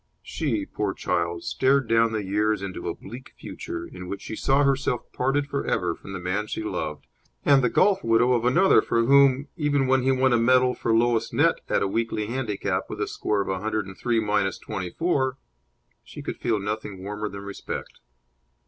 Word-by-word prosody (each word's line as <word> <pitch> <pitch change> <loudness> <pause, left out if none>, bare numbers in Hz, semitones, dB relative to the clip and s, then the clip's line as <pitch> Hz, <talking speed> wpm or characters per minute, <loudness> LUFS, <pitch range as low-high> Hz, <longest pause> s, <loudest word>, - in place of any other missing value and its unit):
She, - - -2
poor - - -3
child, 85 -1 -1
stared 135 -1 +2
down 115 0 +3
the 110 -2 -2
years 105 +1 0
into 95 -3 -5
a - - -4
bleak 120 +6 -11
future, 345 0 -6
in 90 - -9
which 100 - -6
she 110 - -5
saw 135 +5 +2
herself 135 -3 +1
parted 135 +3 0
for 140 -1 -3
ever - - 0
from 95 - -11
the 95 - -4
man 95 +4 -2
she 110 - -4
loved, 80 -7 -4 0.4
and 140 -2 +5
the 125 - +3
golf 195 - +3
widow 115 +2 +3
of 120 -2 +1
another 170 +11 +5
for 115 0 +1
whom 140 +1 +5
even 145 -3 +1
when 130 0 +3
he 130 +1 +2
won 130 -1 +3
a 120 - +4
medal 125 +2 +4
for 115 - -2
lowest 115 0 +2
net - - +3
at - - +2
a - - +1
weekly 110 +1 -1
handicap 115 -3 -2
with - - -6
a - - -1
score 105 -1 -1
of 100 - -4
a 95 -1 -1
hundred 110 0 -2
and 95 0 -10
three 120 +2 0
minus 105 -3 0
twenty 95 -4 -5
four 135 - 0 0.7
she - - -10
could - - -5
feel 110 -3 0
nothing 105 -2 -5
warmer 105 +1 -4
than 100 0 -8
respect. 100 0 -7
115 Hz, 200 wpm, -25 LUFS, 100-130 Hz, 0.7 s, and